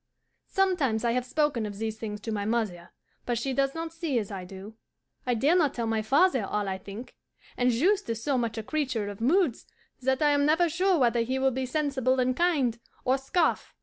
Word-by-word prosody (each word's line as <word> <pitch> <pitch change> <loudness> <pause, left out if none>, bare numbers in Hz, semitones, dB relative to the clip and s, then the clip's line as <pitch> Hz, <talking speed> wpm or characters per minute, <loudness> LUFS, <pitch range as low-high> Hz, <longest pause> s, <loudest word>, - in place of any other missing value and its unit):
Sometimes 310 - +1
I 235 - +3
have 250 +1 -1
spoken 295 -4 +1
of 205 -1 -7
these 220 0 -4
things 210 -2 -5
to 225 - -4
my 205 -2 -2
mother, 210 -6 -2 0.4
but 240 -1 0
she 265 +3 -2
does 275 +2 0
not 325 0 -4
see 330 -6 -2
as 210 -3 -2
I 190 -2 -6
do. 195 +3 -10 0.5
I 245 - +2
dare 285 +9 +3
not 310 -6 +2
tell 235 - -2
my 225 -1 0
father 270 - +3
all 205 +1 -2
I 190 0 -3
think, 205 +6 -9 0.4
and 250 0 +2
Juste 365 - +2
is 230 0 -3
so 280 +1 +1
much 235 -2 -1
a 220 - -3
creature 255 -6 -2
of 205 +1 -9
moods 305 - +2 0.3
that 265 +3 +1
I 295 - +5
am 285 0 +3
never 325 +4 +3
sure 370 +3 +2
whether 240 -4 +3
he 255 +3 -1
will 265 0 +2
be 260 +1 -3
sensible 260 -2 0
and 255 0 +1
kind, 280 -9 +1 0.3
or 260 +2 +2
scoff. 320 +5 0
255 Hz, 215 wpm, -27 LUFS, 225-295 Hz, 0.5 s, I